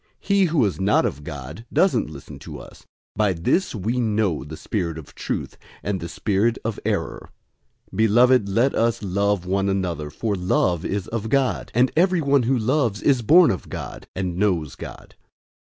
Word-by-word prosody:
He 200 -1 +2
who 155 -8 +2
is 95 - -2
not 100 +2 +3
of 75 - -3
God 75 - -8
doesn't 190 - +2
listen 70 -3 -10
to - - -9
us. - - -14 0.3
By 105 -2 +2
this 90 - 0
we 110 +5 -1
know 105 -7 0
the 80 +2 -9
spirit 85 -6 -3
of 80 - -11
truth, - - -4 0.2
and 100 -1 -1
the 85 - -6
spirit 105 +6 0
of 115 -2 -2
error. - - -2 0.6
004:007 - - -7
Beloved, 110 0 +4
let 120 +7 +2
us 115 -1 0
love 100 0 0
one 95 +1 0
another, 90 -6 -2
for 105 +8 -2
love 90 -2 +1
is 100 -1 -2
of 110 -1 -3
God; 135 -1 0
and 125 +2 +4
everyone 160 -6 +3
who 130 +2 +1
loves 120 -2 0
is 135 -4 +3
born 165 +8 +6
of 95 - -5
God, - - -7
and 90 -2 -3
knows 90 -8 0
God. - - -10
105 Hz, 175 wpm, -23 LUFS, 90-125 Hz, 0.6 s, born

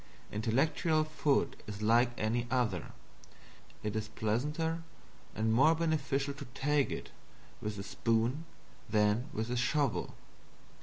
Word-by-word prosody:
Intellectual 145 - +2
food 150 -2 +1
is 105 0 -6
like 120 +3 +5
any 120 +3 0
other; 110 -9 0 0.9
it 105 0 -2
is 110 -1 -1
pleasanter 150 +11 -1 0.5
and 110 +2 +1
more 140 +8 +6
beneficial 140 -4 0
to 140 +1 -8
take 145 0 +2
it - - -5 0.5
with 105 0 -3
a 100 - -4
spoon 115 +8 0 0.4
than 105 +5 +2
with 110 0 -3
a - - 0
shovel. 125 +1 0
125 Hz, 120 wpm, -33 LUFS, 110-150 Hz, 0.9 s, more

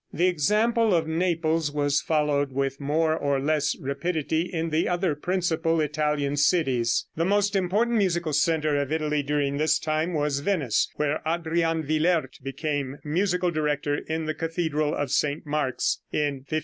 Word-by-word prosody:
The 175 - +1
example 210 +6 +2
of 160 -2 +1
Naples 165 -2 0
was 145 -1 +1
followed 150 -3 +1
with 135 0 -2
more 155 +3 +1
or 140 -3 0
less 150 +1 +1
rapidity 160 +4 -2
in 165 -2 -2
the 155 +2 +1
other 175 -2 +1
principal 165 0 0
Italian 150 -1 0
cities. 135 -7 +2
The 165 - 0
most 205 +2 +1
important 210 +6 +1
musical 170 -5 0
center 155 0 +2
of 140 0 -4
Italy 150 -2 0
during 140 0 -1
this 155 +2 +3
time 155 +2 -1
was 145 -2 0
Venice, 145 - 0
where 150 0 -1
Adrian 165 0 0
Willaert 155 -2 0
became 140 0 -3
musical 180 +3 0
director 150 -2 -1
in 160 +2 -3
the 155 - -1
cathedral 160 -2 -1
of 145 -3 -2
St. 150 +1 0
Mark's, 145 -4 -1
in 140 -3 -1
1527. 155 - +1
155 Hz, 155 wpm, -25 LUFS, 145-170 Hz, -, this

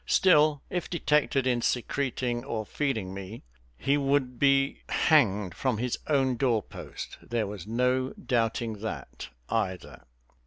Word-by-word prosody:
Still, 150 -5 +4
if 180 -2 -2
detected 145 -6 +1
in 125 -2 +1
secreting 125 -1 -1
or 115 -6 -3
feeding 110 -9 -2
me, 100 +3 -8 0.3
he 140 - +1
would 135 -3 0
be 140 0 +3
hanged 105 - +3
from 125 +2 -1
his 125 +2 -2
own 135 -4 +2
door 120 -5 +2
post. - - -9
There 115 -2 -2
was 100 -2 -7
no 125 +3 +1
doubting 115 -3 -1
that, 100 - -6 0.2
either. 95 -1 -3
125 Hz, 130 wpm, -28 LUFS, 110-140 Hz, 0.3 s, Still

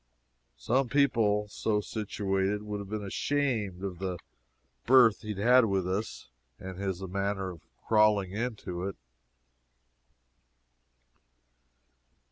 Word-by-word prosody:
Some 125 - 0
people, 110 -7 +2
so 105 +1 -1
situated, 105 -1 -2
would 105 -1 -4
have 100 -1 -8
been 105 0 -3
ashamed 110 -5 -1
of 90 -3 -4
the 95 -2 -3 0.7
berth 120 -4 +6
he 105 -1 -5
had 120 +5 +5
with 95 -3 0
us 95 - -3 0.3
and 95 0 -8
his 95 -1 -3
manner 95 0 -2
of 85 -3 -12 0.2
crawling 105 -3 +3
into 100 -5 -4
it. 100 - -5
105 Hz, 105 wpm, -29 LUFS, 95-110 Hz, 0.7 s, berth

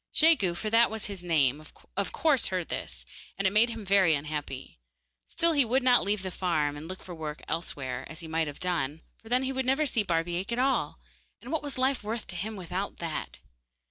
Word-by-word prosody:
Jegu, 295 - +5
for 215 +4 -3
that 230 +1 +6
was 220 -1 -3
his 195 -3 -4
name, 150 -5 +2 0.3
of 200 0 -1
course 300 -5 +3
heard 185 -2 -1
of - - -19
this, - - -4 0.3
and 195 - -1
it 190 - +4
made 225 +3 +5
him 225 -2 -6
very 190 -4 +5
unhappy. 145 - -5 0.5
Still 335 0 +4
he 285 -3 +5
would 255 +3 +1
not 250 -1 +5
leave 200 0 0
the 185 - -3
farm, 155 -6 0
and 150 +2 -8
look 185 +1 -7
for 180 - -8
work 155 -2 -6
elsewhere, 145 -6 -3
as 160 +2 -6
he 165 - -7
might 160 0 0
have 145 - -6
done, 160 -4 -1 0.2
for 225 - -14
then 250 +2 +2
he 265 - -1
would 265 0 0
never 270 +4 +3
see 240 -5 +2
Barbaik 175 +1 -1
at 235 - -1
all, 265 +2 +1 0.4
and 245 - -9
what 320 - +1
was 285 -2 -5
life 260 -1 +1
worth 220 +2 -3
to 180 - -6
him 215 +5 -3
without 185 +1 -4
that? 165 -3 -5
190 Hz, 225 wpm, -29 LUFS, 165-235 Hz, 0.5 s, that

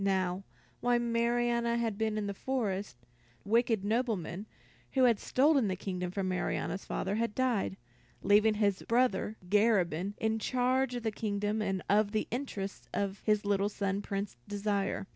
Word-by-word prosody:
Now 190 -1 0 0.4
while 245 0 +2
Marianna 235 0 +1
had 230 -3 -1
been 220 0 -1
in 210 - -1
the 200 - -2
forest, 200 - -2 0.5
the - - -11
wicked 225 -3 +2
nobleman 210 -4 -1 0.5
who 265 - +3
had 235 -4 +5
stolen 275 -3 +3
the 190 - -1
kingdom 180 -1 -4
from 190 +1 -2
Marianna's 185 +1 -2
father 195 +2 -2
had 230 -2 -1
died, 235 - 0 0.5
leaving 215 +1 +5
his 205 -2 +1
brother 230 -3 +1
Garabin 200 -3 +2
in 220 0 0
charge 255 +2 +1
of 240 - -4
the 220 - 0
kingdom 210 0 -1
and 195 -3 -1
of 205 +1 +3
the 215 - 0
interests 210 -6 -4
of 200 0 -1
his 210 -1 +2
little 200 0 +2
son, 200 -1 -2
Prince 195 -8 -4
Desire. 200 -1 -1
210 Hz, 160 wpm, -31 LUFS, 195-235 Hz, 0.5 s, had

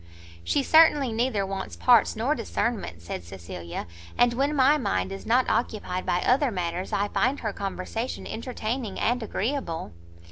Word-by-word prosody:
"She 280 - +1
certainly 300 -4 +5
neither 225 -3 0
wants 195 0 -5
parts 240 -4 +4
nor 240 +7 +1
discernment," 210 - -3
said 85 - -5
Cecilia; 85 -1 -7 0.3
"and, 245 0 +4
when 280 +4 0
my 275 +2 +5
mind 95 - -1
is 95 0 -7
not 250 +2 +3
occupied 205 -6 -1
by 175 - +1
other 265 +2 +3
matters, 180 -2 -3
I 200 +1 +1
find 260 +7 +1
her 215 -3 -2
conversation 200 +5 -4
entertaining 230 -2 -4
and 245 +2 +1
agreeable." 220 - -3
225 Hz, 150 wpm, -26 LUFS, 185-255 Hz, 0.3 s, certainly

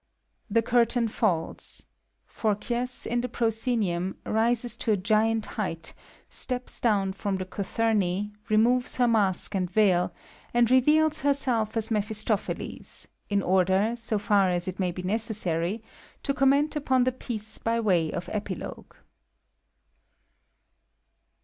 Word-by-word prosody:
[ - - -45
The 230 - +4
curtain 235 0 +2
falU. 190 -7 0 0.7
Phobkyjls, 240 +4 -1
in 240 +1 0
the 250 - -2
proscenvumy 220 -6 0
rises 235 +1 +1
to 225 - -1
a 210 - +3
giant 215 +3 +1 0.2
height, 165 -5 -4 0.3
steps 250 -1 -2
down 200 -5 +2
from 195 0 -2
the 185 - -4
cothnmi, 205 0 -1 0.2
removes 240 +4 +3
her 245 -1 +3
mask 205 -4 +1
a/nd 185 -2 -1
veil, 185 -3 +3 0.4
and 240 0 +4
reveals 305 +4 +4
herself 255 -6 +1
as 225 0 0
Mephistophelbs, 215 0 -2 0.2
in 200 -1 +1
order, 190 +4 +2
so 230 -2 -2
far 205 -2 +3
as 175 +1 -1
it 185 +1 -5
wkit/ 180 -2 -1
be 180 - -5
necessary, 200 -2 -1 0.4
to 275 - 0
comment 280 +3 +3
upon 265 -4 +2
the 255 - +2
piece 220 -4 -5
by 230 0 0
way 180 -8 +2
of 175 +1 -5
Epilogue. 210 -1 -6
220 Hz, 130 wpm, -27 LUFS, 190-240 Hz, 0.7 s, The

